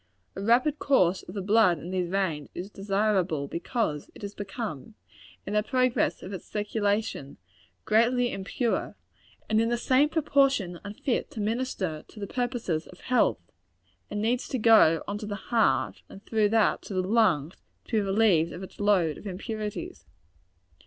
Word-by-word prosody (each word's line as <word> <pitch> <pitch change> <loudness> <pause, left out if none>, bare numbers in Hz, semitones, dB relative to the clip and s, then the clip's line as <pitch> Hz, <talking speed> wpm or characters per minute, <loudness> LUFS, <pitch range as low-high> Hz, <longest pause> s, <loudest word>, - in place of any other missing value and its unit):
A 195 - -5
rapid 250 +8 +3
course 185 -10 +3
of 180 - -11
the 200 - -3
blood 205 -3 +4
in 170 +5 -8
these 180 -2 -1
veins, 175 -7 -1
is 185 +4 -6
desirable, 195 -7 0
because 170 - -2
it - - -13
has 200 0 -5
become, 205 - -6 0.5
in 200 - -4
the 210 - +3
progress 255 +3 +1
of 190 - -7
its 185 - -7
circulation, 205 -7 -2 0.5
greatly 240 +3 +3
impure, 220 +5 -2 0.5
and 215 +1 +3
in 230 - +1
the 240 - +1
same 265 +4 +3
proportion 275 - +1
unfit 210 +5 -2
to - - -8
minister 210 -7 -2
to 215 - -13
the 200 - -3
purposes 235 -9 -2
of 180 - -15
health 220 - +1 0.6
and 205 - -3
needs 240 +3 0
to 260 - -2
go 215 -8 +5
on 205 +1 -3
to 210 - -6
the 205 - -3
heart, 225 +1 +1
and 195 - -13
through 215 -2 +2
that 225 0 +2
to 195 - -7
the 185 - +1
lungs, 185 -7 +2 0.3
to 225 - +1
be - - +3
relieved 195 -5 +2
of 180 - -7
its 190 - -11
load 190 -7 +2
of - - -9
impurities. 210 - -5
205 Hz, 165 wpm, -27 LUFS, 185-230 Hz, 0.6 s, go